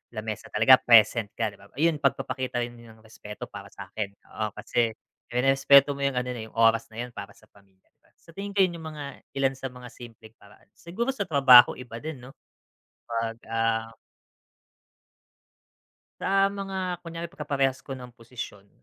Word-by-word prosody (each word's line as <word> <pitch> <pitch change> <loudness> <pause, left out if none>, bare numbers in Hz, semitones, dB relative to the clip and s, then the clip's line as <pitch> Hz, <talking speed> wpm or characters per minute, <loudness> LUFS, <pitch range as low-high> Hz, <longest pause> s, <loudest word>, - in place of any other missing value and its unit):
lamesa 110 0 -5
talaga, 125 +5 +6
present 115 -2 +5
ka 115 -1 0
'di - - -17
ba, 100 - -16
ayun 160 +1 +2
pagpapakita 130 -3 -1
rin 120 0 -7
ng 110 -1 -16
respeto 105 -1 -10
para - - -9
sa'kin. 100 -2 -6 0.3
Oo 105 -1 -2
kasi 115 +1 0 0.4
nererespeto 135 +2 +5
mo - - -7
yung 140 -2 0
ano 125 0 -1
na 120 - -6
yung - - -20
oras 115 0 +4
na 115 - -5
yun 125 - -5
para 100 - -8
sa - - -23
pamilya. 95 -2 -26 0.3
Sa - - -25
tingin 200 +2 -6
ko 195 - +3
yung 180 -2 +2 0.2
mga 145 -2 -8 0.2
ilan 135 0 +2
sa 135 - -5
mga 125 0 -11
simpleng 115 -2 -13
paraan 100 -1 -21
siguro 230 +10 -4
sa 235 -7 -2
trabaho 135 -6 +7
iba 120 -2 -9
din 155 -3 -7
'no 125 +2 -12 0.8
pag 115 -1 -3
ah 115 0 0 2.3
Sa 195 0 +3
mga 190 -3 -4
kunyari 170 0 -6
pagkaparehas 140 -5 -1
ko 135 -2 -7
ng 125 -1 -11
posisyon, 115 -4 -9
125 Hz, 165 wpm, -26 LUFS, 115-145 Hz, 2.3 s, trabaho